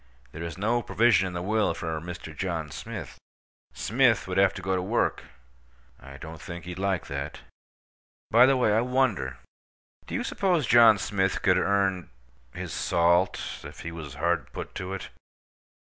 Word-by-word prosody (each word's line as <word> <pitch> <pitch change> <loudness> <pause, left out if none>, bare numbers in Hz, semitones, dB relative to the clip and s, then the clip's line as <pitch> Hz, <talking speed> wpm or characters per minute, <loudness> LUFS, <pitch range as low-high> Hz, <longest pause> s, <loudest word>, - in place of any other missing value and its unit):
There 80 - -8
is 85 0 -5
no 115 +5 +1
provision 115 -4 +3
in 90 - -6
the 90 0 -4
will 105 +2 +1
for 80 -3 -4
Mr. 85 -2 -8
John 80 -4 -3
Smith. - - -7 0.5
Smith 115 -6 +2
would 95 0 0
have 95 -1 +5
to - - -6
go 95 0 0
to 90 - 0
work. 105 +6 0 0.7
I 70 0 -12
don't 80 +1 -9
think 85 +2 -8
he'd 90 0 -7
like 95 -2 0
that. 70 +2 -5 0.9
By 120 +3 +7
the 135 0 +4
way, 115 -4 +3
I 110 - +3
wonder: 120 - 0 0.7
do - - -4
you - - -1
suppose 180 -7 +1
John 115 -2 +7
Smith 95 -1 -1
could 90 -2 +4
earn—his 80 -12 -3
salt, 85 +2 +2 0.2
if - - -10
he 85 - -6
was 80 -5 -8
hard 85 +2 -1
put - - -6
to 95 0 -5
it? 95 - -6
95 Hz, 165 wpm, -27 LUFS, 80-110 Hz, 0.9 s, By